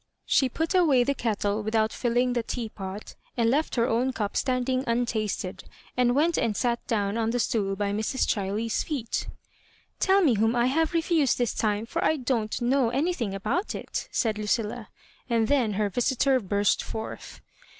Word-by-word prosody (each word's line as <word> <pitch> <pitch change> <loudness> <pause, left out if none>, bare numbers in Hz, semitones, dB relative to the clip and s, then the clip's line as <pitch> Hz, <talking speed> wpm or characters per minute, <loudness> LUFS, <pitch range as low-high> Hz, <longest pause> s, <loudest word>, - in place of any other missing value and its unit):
She 265 - +3
put 320 +7 -2
away 310 -9 +4
the 280 - +1
kettle 210 -4 -1
with 215 +2 -3
out 220 0 +2
filling 245 +1 +1
the 240 - +1
teapot 210 -4 -6 0.2
and 230 -1 +3
left 300 +4 0
her 235 -1 +2
own 255 +2 +1
cup 205 -3 -3
stand 255 -1 0
ing 260 0 +1
untasted, 220 -5 -2 0.3
and 245 0 +2
went 320 +4 +2
and 215 -3 0
sat 240 -1 0
down 205 -1 0
on 225 0 +1
the 240 - 0
stool 200 -4 0
by 200 0 -1
Mrs. 220 +5 0
Chiley's 210 +2 -1
feet 270 -8 -3 0.7
Tell 385 +1 +4
me 280 -7 +4
whom 225 +2 +2
I 240 0 +3
have 320 +6 +1
refused 325 -5 +2
this 245 -2 0
time, 210 0 0
for - - -2
I 315 - +2
don^t 240 -3 -1
know 255 0 +2
any 290 +9 0
thing 220 - -3
about 245 - -2
it," - - -5
said 215 -2 0
Lucilla; 215 +2 -2 0.4
and 230 -2 +2
then 245 -6 +2
her 210 +1 +1
visitor 260 +3 +2
burst 200 -1 +1
forth. 220 0 -7
235 Hz, 180 wpm, -26 LUFS, 215-260 Hz, 0.7 s, away